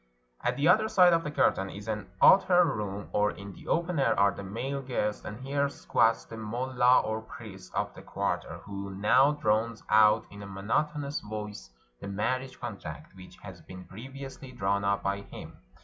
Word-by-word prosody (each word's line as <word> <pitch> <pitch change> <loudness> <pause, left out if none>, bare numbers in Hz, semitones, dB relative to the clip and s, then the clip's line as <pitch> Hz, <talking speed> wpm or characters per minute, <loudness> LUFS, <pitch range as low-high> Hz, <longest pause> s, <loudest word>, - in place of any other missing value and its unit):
At - - 0
the 145 +3 +2
other 215 +5 +5
side 180 -4 +6
of 165 0 +2
the - - -3
curtain, 95 -9 +1
in 105 +2 -9
an 105 -3 -4
outer 180 -2 +7
room 105 - -3
or 105 0 +3
in 100 -1 -8
the - - -14
open 170 -1 0
air, 135 - +2
are 100 0 +5
the 100 - -8
male 120 +8 -4
guests; 115 -5 -2
and 105 +2 -7
here 140 +1 0
squats 115 -4 +1
the 115 - -9
mullah 125 +3 +2
or 110 0 -3
priest 100 -4 -11
of - - -1
the - - -11
quarter, - - -3
who 100 -1 -6
now 135 +8 +4
drones 110 -4 0
out 110 0 +5
in 100 0 -10
a 100 - -8
monotonous 140 +9 -2
voice 105 - -7 0.3
the - - -7
marriage 130 +6 -2
contract, 100 -8 -8
which 90 -1 -13
has 95 -4 -10
been 90 +2 -11
previously 135 +4 -9
drawn 100 -3 -1
up 100 0 0
by 100 0 -1
him. - - -11
110 Hz, 185 wpm, -29 LUFS, 100-135 Hz, 0.3 s, outer